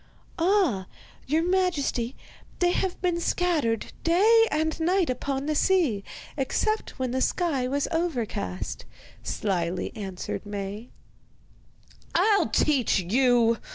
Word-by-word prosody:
'Ah, 330 - +2 0.4
your 315 +4 +2
majesty, 340 -9 0 0.4
they 355 -1 +2
have 370 0 -1
been 350 -1 +1
scattered 315 -12 0
day 440 +7 +5
and 315 +1 -1
night 350 -2 +2
upon 270 +2 -3
the 305 - 0
sea, 300 - +2 0.3
except 430 +10 -1
when 255 -2 -2
the 260 +1 -1
sky 280 -5 0
was 280 +2 0
overcast,' 245 - -3 0.4
slyly 180 -3 -2
answered 190 -4 -5
Maie. 205 +2 -6 1.3
'I'll 420 -2 +3
teach 275 -7 +2
you! 230 +3 +3
280 Hz, 110 wpm, -26 LUFS, 230-355 Hz, 1.3 s, day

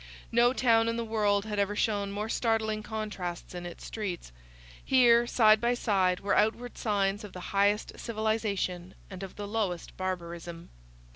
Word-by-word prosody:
No 240 +1 +5
town 230 -3 +3
in 230 0 -1
the 235 - -1
world 210 -2 +1
had 210 -1 -3
ever 200 +1 0
shown 205 -2 0
more 210 +2 -3
startling 220 -2 0
contrasts 210 -6 -5
in 175 -1 -6
its 175 - -10
streets. 190 - -5 0.5
Here, 240 -2 +5
side 215 -3 +5
by 240 +1 +2
side, 190 -6 +1
were 200 - +1
outward 230 +3 +1
signs 205 -1 0
of 205 - -9
the 180 - -7
highest 205 +1 +1
civilization 215 -5 -2 0.2
and 185 0 -8
of 195 -1 -7
the 205 -1 -6
lowest 200 -5 -3
barbarism. 170 -2 -5
210 Hz, 160 wpm, -29 LUFS, 190-225 Hz, 0.5 s, No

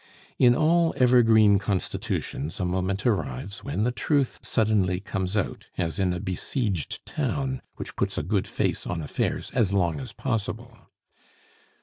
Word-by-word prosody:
In 120 -1 +6
all 165 +3 +3
evergreen 115 -5 +6
constitutions 90 -5 -3
a 90 - 0
moment 95 +2 -1
arrives 95 - -1
when 100 - -1
the 125 - +2
truth 140 +1 0
suddenly 105 -5 +1
comes 95 0 -2
out, 100 - -2
as 85 +3 -1
in 95 -2 +2
a 90 - -2
besieged 95 - -2
town 135 -2 -2
which - - -7
puts - - -1
a - - 0
good - - 0
face - - -1
on 85 -2 -3
affairs 75 - -2
as 100 -4 +1
long 85 -4 +1
as 130 -2 -6
possible. 115 -1 -3
105 Hz, 145 wpm, -26 LUFS, 90-125 Hz, -, In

